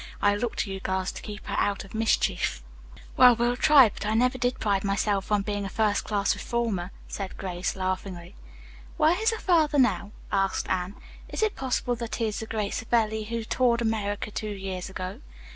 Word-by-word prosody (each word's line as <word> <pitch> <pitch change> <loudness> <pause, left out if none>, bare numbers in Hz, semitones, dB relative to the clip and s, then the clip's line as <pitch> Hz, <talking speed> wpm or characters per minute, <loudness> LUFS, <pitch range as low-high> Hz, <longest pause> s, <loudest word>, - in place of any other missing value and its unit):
I 205 0 +3
look 225 +2 -2
to 195 - -2
you 190 - -5
girls 190 0 -1
to - - -9
keep 210 0 -8
her - - -3
out 200 -1 0
of 195 - -14
mischief." 220 - +1 0.5
"Well, 250 -1 +8
we'll 240 +1 +1
try, 275 -1 +7
but 200 - -8
I 215 +1 0
never 250 +3 +2
did 245 0 0
pride 200 -3 +1
myself 200 0 0
on 205 -1 +3
being 205 0 -2
a 195 - -4
first 210 +1 +1
class 205 -2 +1
reformer," 225 -7 -2 0.2
said 195 -2 -6
Grace, 180 -1 -3
laughing. 185 -1 -4 0.6
"Where 325 +5 +3
is 445 - +4
her 450 - -1
father 320 -7 +3
now?" 250 -5 +2 0.2
asked 195 0 0
Anne. 185 +1 -1 0.3
"Is - - -2
it 435 - +1
possible 250 -2 -1
that 235 -1 -4
he 230 - -1
is 215 -1 -2
the 220 - -6
great 210 -3 -2
Savelli 220 -2 0
who 230 +1 -3
toured 235 0 +2
America 210 -2 -1
two 215 - -4
years 190 -3 -5
ago?" 190 +5 -6
210 Hz, 195 wpm, -27 LUFS, 195-235 Hz, 0.6 s, Well